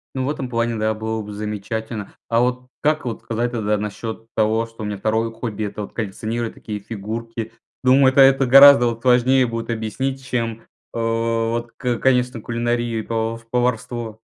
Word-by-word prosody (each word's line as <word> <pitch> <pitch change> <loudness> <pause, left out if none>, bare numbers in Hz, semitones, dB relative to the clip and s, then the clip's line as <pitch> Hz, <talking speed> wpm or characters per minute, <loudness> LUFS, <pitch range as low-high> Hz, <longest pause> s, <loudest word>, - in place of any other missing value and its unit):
Ну, 130 -1 -1
в - - -1
этом 135 -4 -3
плане, 115 0 0
да, 110 0 0
было 110 0 -3
бы 105 - -8
замечательно. 105 +1 -5 0.2
А 115 - +3
вот 125 +1 -1
как 155 0 +1
вот 115 -3 -4
сказать, 120 +1 -2
тогда 105 -3 0
насчет 110 +2 -5
того, 110 +1 +2
что 115 -1 -13
у 105 - -3
меня 105 -1 -3
2 110 +2 0
хобби- 110 -2 -4
это 105 +1 -5
вот - - -10
коллекционировать 115 +2 -3
такие 105 -1 -6
фигурки? 115 +2 -6 0.3
Думаю, 130 +1 +6
это 135 - +5
это 135 0 +6
гораздо 135 -1 +9
от 115 0 -9
важнее 125 +1 +4
будет 115 0 -4
объяснить, 130 +4 -3
чем, 115 -3 -2
э, - - -25 0.3
вот, 115 0 -1
ка 125 -2 -1
конечно, 125 -2 +1
кулинарию 120 0 -1
и - - -1
пов 115 0 -3
поварство. 120 -2 -2
115 Hz, 180 wpm, -21 LUFS, 110-125 Hz, 0.3 s, гораздо